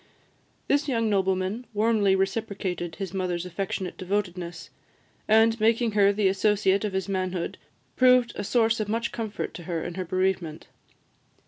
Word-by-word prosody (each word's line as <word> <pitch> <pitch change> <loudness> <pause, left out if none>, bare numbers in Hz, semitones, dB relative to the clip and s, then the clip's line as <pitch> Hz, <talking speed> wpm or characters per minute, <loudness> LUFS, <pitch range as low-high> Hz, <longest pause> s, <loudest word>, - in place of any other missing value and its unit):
This 285 +1 +2
young 230 -5 +1
nobleman 190 +4 0
warmly 210 -2 +3
reciprocated 190 -3 -2
his 195 -1 -5
mother's 180 -2 -2
affectionate 185 0 -4
devotedness; 175 -4 -3 0.6
and, 225 +1 +4
making 230 +1 +2
her 200 -1 +4
the 205 -1 +1
associate 195 0 +2
of 210 -2 -2
his 190 -1 -2
manhood, 185 -2 -2 0.4
proved 250 -1 +5
a 205 - -3
source 225 +1 +2
of 210 -1 -2
much 230 +2 -1
comfort 220 -3 -4
to 175 - -9
her 165 -2 -2
in 175 - -5
her 185 +1 -4
bereavement. 185 -3 -1
195 Hz, 145 wpm, -26 LUFS, 185-220 Hz, 0.6 s, proved